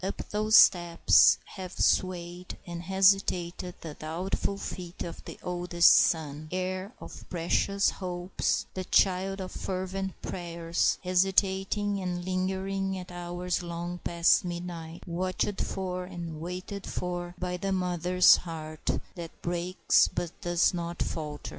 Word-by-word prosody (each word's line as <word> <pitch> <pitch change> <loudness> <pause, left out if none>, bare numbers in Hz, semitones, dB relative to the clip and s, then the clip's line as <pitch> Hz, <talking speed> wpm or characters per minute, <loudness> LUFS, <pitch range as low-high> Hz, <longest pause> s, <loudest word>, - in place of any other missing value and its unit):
Up 195 - -4
those 215 +1 +2
steps 175 -4 +6
have 185 -2 -8
swayed 180 -1 0
and 170 -1 -6
hesitated 185 -1 +2
the 160 -2 -7
doubtful 175 +6 -3
feet 180 -3 -6
of 170 - -8
the - - -8
oldest 175 -1 +4
son, 155 -1 +1
heir 185 +2 -3
of - - -10
precious 195 +3 +1
hopes 180 -1 -2
and 185 -1 -5
child 195 +1 +3
of 185 -1 -5
fervent 190 0 -4
prayers, 170 -1 -1
hesitating 195 +2 +1
and 175 -1 -3
lingering 190 +1 -1
at 180 -1 -8
hours 175 0 -3
long 175 +1 -5
past 170 0 +3
midnight, 175 -2 -6
watched 185 +3 -1
for 185 -1 -3
and 170 -4 -7
waited 185 +3 -6
for 175 0 -4
by 180 0 -3
the 195 +2 -2
mother's 180 -1 +4
heart 155 -2 -6 0.2
that 170 -2 -9
breaks 175 +1 +2
but 175 -2 -4
does 175 -1 +2
not 170 0 -4
falter. 150 -2 -4
180 Hz, 130 wpm, -28 LUFS, 170-190 Hz, 0.2 s, steps